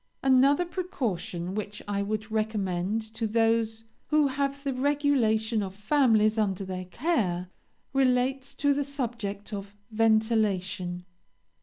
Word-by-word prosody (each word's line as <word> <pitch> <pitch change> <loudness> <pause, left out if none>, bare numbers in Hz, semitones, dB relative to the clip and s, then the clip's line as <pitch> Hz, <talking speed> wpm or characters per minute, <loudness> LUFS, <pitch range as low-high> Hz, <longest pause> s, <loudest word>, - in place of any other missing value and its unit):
"Another 270 +5 +5
precaution 195 - -3
which 210 0 -4
I 200 -1 -1
would 215 +2 -3
recommend 210 -2 -1
to 225 0 -2
those 225 0 +1 0.2
who 300 -2 +3
have 280 +1 -2
the 275 -2 -1
regulation 255 -6 +2
of 190 -1 -5
families 220 -2 +3
under 195 -2 0
their 185 -1 -5
care, 185 - -1 0.4
relates 260 0 +1
to 285 0 +2
the 285 +1 0
subject 230 -7 -4
of 200 0 -6 0.2
ventilation. 215 -5 +1
220 Hz, 120 wpm, -28 LUFS, 200-270 Hz, 0.4 s, Another